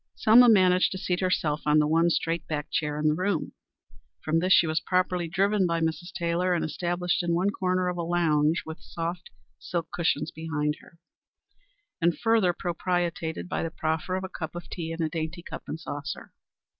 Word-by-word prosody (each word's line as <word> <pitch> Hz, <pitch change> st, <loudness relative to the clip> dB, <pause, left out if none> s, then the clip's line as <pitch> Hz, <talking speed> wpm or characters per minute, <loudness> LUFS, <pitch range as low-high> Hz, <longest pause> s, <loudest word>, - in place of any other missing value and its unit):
Selma 240 Hz, +3 st, +7 dB
managed 185 Hz, -4 st, +5 dB
to 190 Hz, -, -4 dB
seat 180 Hz, -1 st, -1 dB
herself 160 Hz, -5 st, 0 dB
on 150 Hz, +1 st, +5 dB
the 150 Hz, -, +4 dB
one 165 Hz, +3 st, +3 dB
straight 165 Hz, 0 st, -1 dB
backed 150 Hz, -1 st, -4 dB
chair 150 Hz, -1 st, -1 dB
in 150 Hz, 0 st, +1 dB
the 150 Hz, -, +4 dB
room. 180 Hz, 0 st, -1 dB, 0.7 s
From 160 Hz, +1 st, +1 dB
this 185 Hz, +2 st, 0 dB
she 175 Hz, -, +7 dB
was 155 Hz, 0 st, 0 dB
promptly 180 Hz, -1 st, 0 dB
driven 195 Hz, +2 st, +2 dB
by 170 Hz, 0 st, 0 dB
Mrs. 165 Hz, +3 st, -2 dB
Taylor 175 Hz, 0 st, 0 dB
and 170 Hz, -, -1 dB
established 175 Hz, +3 st, -1 dB
in 170 Hz, -1 st, 0 dB
one 190 Hz, +4 st, +1 dB
corner 185 Hz, -1 st, 0 dB
of 180 Hz, 0 st, -2 dB
a -, -, -1 dB
lounge 165 Hz, -2 st, +2 dB
with 160 Hz, 0 st, -7 dB
a -, -, -28 dB
soft 170 Hz, +2 st, -5 dB, 0.3 s
silk 170 Hz, -2 st, -4 dB
cushion 160 Hz, -4 st, 0 dB
behind 150 Hz, -2 st, -2 dB
her, 170 Hz, -, -19 dB, 1.0 s
and 170 Hz, 0 st, +2 dB
further 225 Hz, -5 st, +3 dB
propitiated 170 Hz, -, -2 dB
by -, -, -2 dB
the 165 Hz, -, -2 dB
proffer 160 Hz, +3 st, -2 dB
of 190 Hz, -, -3 dB
a -, -, -3 dB
cup 160 Hz, -2 st, -7 dB
of 175 Hz, -, -8 dB
tea 165 Hz, -2 st, -4 dB
in 165 Hz, 0 st, -2 dB
a -, -, +1 dB
dainty 165 Hz, +2 st, -4 dB
cup -, -, -8 dB
and 160 Hz, -, -5 dB
saucer. 145 Hz, -2 st, -6 dB
170 Hz, 195 wpm, -27 LUFS, 160-180 Hz, 1.0 s, Selma